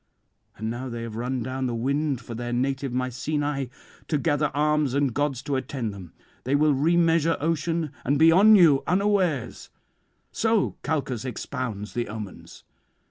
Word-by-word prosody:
And 110 +2 -3
now 125 +2 -5
they 115 -1 -5
have 115 -2 -6
run 125 +1 -2
down 130 +1 -2
the 120 - -2
wind 140 +2 -1
for 115 - -8
their 120 +1 -4
native 135 +2 -1
Mycenae, 135 +2 -2 0.4
to 155 - +1
gather 150 0 +1
arms 150 -1 +1
and 140 -3 +1
gods 140 -2 -1
to 145 -2 -2
attend 130 -5 -4
them; 95 -4 -10 0.3
they 135 +3 +1
will 150 0 +4
remeasure 165 +2 +3
ocean 165 0 -1
and 140 +3 +1
be 160 +2 +6
on 210 +5 +7
you 160 -8 +6
unawares. 185 - 0 0.6
So 225 -3 +1
Calchas 135 -7 -2
expounds 125 -4 -5
the 120 -1 -2
omens. 105 -3 -9
140 Hz, 155 wpm, -25 LUFS, 120-155 Hz, 0.6 s, on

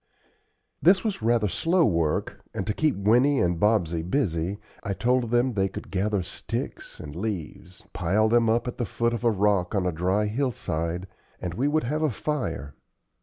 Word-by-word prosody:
This 190 +3 +5
was 210 - -2
rather 115 -1 +2
slow 165 - +2
work, 85 -6 0
and - - -2
to 105 - -1
keep 155 +4 +1
Winnie 125 +8 +3
and 85 -1 +1
Bobsey 90 -6 +2
busy 90 - -1 0.2
I 100 - -2
told 125 +3 +1
them 120 +2 +2
they 95 -2 +1
could - - -8
gather 100 0 0
sticks - - -5
and 75 0 -8
leaves, 90 -2 -5
pile 100 +6 +2
them 115 0 +3
up 115 +2 +1
at 125 - -5
the 120 - 0
foot 115 0 0
of 120 - -3
a 120 - +5
rock 100 -2 +1
on 95 -2 +1
a 90 - +1
dry 95 +6 +1
hillside, 95 - -2 0.3
and 90 -2 -4
we 125 +9 0
would 155 +2 +1
have 150 +6 -1
a 155 - +2
fire. 95 - -3
105 Hz, 180 wpm, -26 LUFS, 90-120 Hz, 0.3 s, This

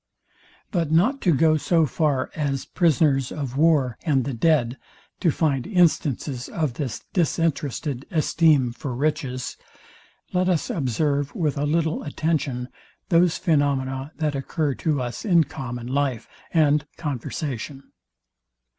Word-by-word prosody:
But 170 -7 0
not 210 - +3
to 180 - +3
go 155 +1 +4
so 165 +1 +2
far 140 -1 0
as 140 -4 -2
prisoners 145 -6 +2
of 135 -5 -4
war 145 -5 +3
and 140 -6 +1
the 140 - -3
dead 125 -1 +2 0.4
to 175 - +2
find 145 -3 0
instances 150 - +1
of 155 -7 -1
this 130 -3 -4
disinterested 150 -5 -1
esteem 155 -6 +3
for 125 +1 -5
riches, 135 -3 -2 0.8
let 180 0 +2
us 175 -4 0
observe 140 +1 -1
with 155 -5 0
a 145 0 -1
little 160 +1 0
attention 145 -5 -2 0.4
those 170 -1 +4
phaenomena 140 -4 0
that 155 -2 -1
occur 140 +1 -1
to 150 +1 -1
us 120 -1 -5
in 175 -7 +4
common 125 -4 -6
life 130 -2 -1 0.2
and 150 -2 +3
conversation. 140 -1 -5
145 Hz, 130 wpm, -24 LUFS, 135-160 Hz, 0.8 s, go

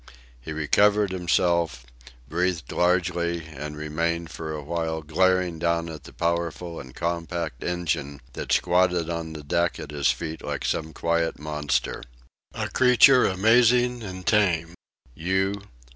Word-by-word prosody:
He 60 - -8
recovered 100 +6 +3
himself, 85 -7 +1 0.4
breathed 85 0 -1
largely, 85 -2 +1
and 75 -1 -7
remained 85 +2 -2
for 80 -1 -6
a 75 -1 -5
while 80 0 -3
glaring 90 +2 +1
down 85 0 0
at 80 -2 -9
the - - -11
powerful 85 0 -2
and 65 -2 -11
compact 85 -5 -3
engine 75 -5 -2
that - - -5
squatted 90 -1 +2
on 85 -1 -4
the 75 -1 -8
deck 85 +4 0
at - - -7
his 70 -2 +1
feet 80 -1 -3
like - - -4
some 80 0 -1
quiet 85 0 0
monster 75 -1 -2 0.5
a - - -3
creature 125 0 +6
amazing 120 +5 +3
and 95 -3 -7
tame. 90 -7 +2 0.4
"You... 95 +6 -1
85 Hz, 135 wpm, -25 LUFS, 80-90 Hz, 0.5 s, creature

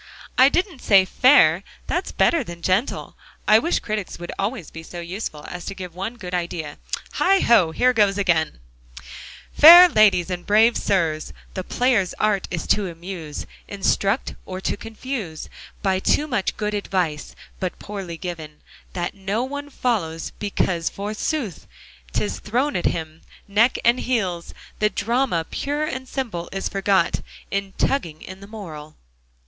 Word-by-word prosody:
"I 260 +2 +7
didn't 355 -4 -1
say 195 -3 +5
'fair'; 190 - +5 0.2
that's 355 +2 -2
better 335 -4 +2
than 170 -5 -10
'gentle.' 190 +8 0 0.3
I 215 +1 +7
wish 335 +9 0
critics 210 -3 -4
would 175 0 -7
always 200 - -3
be 160 - -8
so 175 +2 -9
useful 170 -3 -6
as 180 -1 -7
to 195 - -5
give 180 -3 -7
one 195 +7 -5
good 185 -6 -8
idea. 170 -4 -3 0.4
Heigho! 235 - +4
here 250 +10 +2
goes 205 -3 +3
again: 165 - +1 0.9
"'Fair 345 +4 +11
ladies 200 - +4
and 180 -1 -3
brave 220 +4 +4
sirs, 165 -6 0 0.2
The 185 - -4
player's 230 -5 +1
art 210 -3 0
is 170 -3 -3
to 205 -3 +2
amuse, 165 -3 -7 0.2
Instruct, 200 +2 0
or 185 0 -6
to - - -1
confuse 220 - -6 0.3
By 190 -2 +2
too 295 - +2
much 240 -10 -2
good 210 0 -2
advice, 180 -7 -2 0.2
But 185 -1 -3
poorly 195 -5 -7
given: 160 -4 -7 0.3
That 175 -1 -3
no 200 +4 -2
one 285 +2 -5
follows, 195 - -2
because, 185 -4 0
forsooth, 210 - -4 0.4
'Tis 95 +6 -2
thrown 255 +7 -1
at 175 - -1
him, 160 -1 -3 0.3
neck 215 +5 +3
and 240 +2 +4
heels. 190 -9 -2 0.2
The 210 - +3
drama, 225 -4 0
pure 290 +2 -2
and 260 -4 -4
simple, 220 -11 -4
is 195 0 -3
forgot 195 -2 +1 0.3
In 195 -1 -2
tugging 165 - -1
in 185 +1 -9
the 200 - -12
moral'"? 160 -8 -9
195 Hz, 150 wpm, -22 LUFS, 175-235 Hz, 0.9 s, Fair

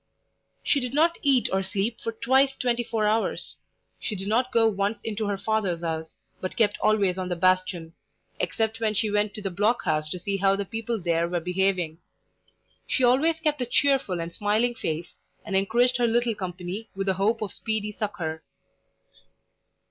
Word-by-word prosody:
She 285 - +2
did 250 0 -4
not 335 +3 +3
eat 270 -4 +3
or 190 - +2
sleep 195 +4 -2
for 230 - -2
twice 265 +4 +2
twenty 240 -2 0
four 220 -2 -1
hours. 220 +2 0 0.4
She 215 - -4
did 195 0 -5
not 245 +4 +1
go 230 -1 +4
once 205 0 0
into 215 -1 -2
her 200 -1 -1
father's 195 -4 -1
house, 160 -1 -3 0.2
but 185 - -4
kept 210 -3 +2
always 200 -4 +2
on 185 -1 -3
the 175 - -1
bastion, 185 -2 +1 0.5
except 225 0 0
when 215 -1 0
she 215 +1 +1
went 210 0 +1
to 210 - -6
the 195 - -2
block 210 +7 +1
house 155 0 0
to 180 - -4
see 195 +3 -2
how 195 0 +3
the 200 0 -2
people 225 +1 -3
there 170 -1 0
were 175 0 0
behaving. 180 -2 0 0.9
She 260 - +1
always 290 +7 +4
kept 300 -3 0
a - - +1
cheerful 265 -8 +2
and 165 0 -5
smiling 215 +4 +1
face, 165 -6 -4 0.3
and 200 -3 -3
encouraged 240 +6 +3
her 240 -1 +2
little 235 0 +2
company 185 +2 -5
with 195 0 -2
the 190 - +2
hope 215 +4 +1
of 205 - -5
speedy 215 -1 -2
succour. 180 -7 -4
210 Hz, 185 wpm, -26 LUFS, 185-230 Hz, 0.9 s, go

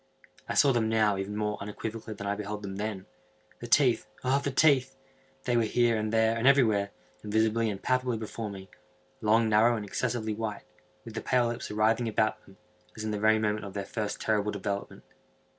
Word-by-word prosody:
I - - -2
saw 140 - +5
them 115 -3 +1
now 110 -2 +3
even 100 +2 -4
more 105 0 -2
unequivocally 110 +2 -6
than 100 0 -7
I 100 - 0
beheld 105 0 -5
them 95 -1 -5
then. 105 -2 -4 0.5
The - - -7
teeth!—the 140 +2 +1
teeth!—they 135 -2 0
were 120 - +4
here, 115 +1 +2
and 110 0 -1
there, 110 0 +3
and 115 +3 +1
everywhere, 110 -8 +4 0.3
and 105 - -7
visibly 110 +1 +2
and 100 -2 -4
palpably 125 -1 0
before 110 0 -5
me; 95 -1 -10 0.5
long, 110 +1 +3
narrow, 110 +2 +4
and 105 - -5
excessively 110 +1 -2
white, 105 -1 -4 0.4
with 115 - -9
the 110 - -4
pale 125 -2 +2
lips 120 0 -5
writhing 110 +3 +1
about 110 0 0
them, 95 - -17 0.4
as 110 - -5
in 110 - -2
the 105 - -2
very 110 +1 +4
moment 105 -1 -1
of 100 -1 -8
their 100 -1 -3
first 105 0 -4
terrible 105 -1 0
development. 100 0 -4
110 Hz, 190 wpm, -29 LUFS, 105-120 Hz, 0.5 s, saw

